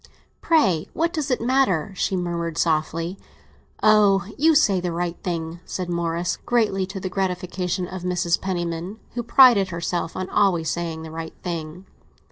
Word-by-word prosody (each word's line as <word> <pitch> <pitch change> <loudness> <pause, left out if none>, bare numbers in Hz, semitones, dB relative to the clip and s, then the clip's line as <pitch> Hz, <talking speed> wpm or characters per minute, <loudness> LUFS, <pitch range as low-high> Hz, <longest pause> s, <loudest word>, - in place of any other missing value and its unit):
"Pray, 190 - +2
what 335 +2 0
does 310 -4 -2
it 250 - +1
matter?" 230 - +1
she 190 - 0
murmured 170 -2 -3
softly. 165 +3 0 0.6
"Ah, 205 -4 +5
you 320 +2 +4
say 205 -11 +4
the 175 -1 -2
right 170 0 -2
thing!" 165 -1 -4
said 180 -1 -4
Morris, 170 0 -1
greatly 210 -6 0
to 195 0 -6
the 185 - -4
gratification 180 -1 -2
of 185 0 -7
Mrs. 175 -1 0
Penniman, 175 +1 -3 0.2
who 240 - -2
prided 235 -4 +6
herself 170 -1 -3
on 185 0 -3
always 180 -6 +2
saying 165 -2 -4
the 160 - -8
right 160 0 -7
thing. 170 +1 -5
180 Hz, 155 wpm, -23 LUFS, 170-200 Hz, 0.6 s, prided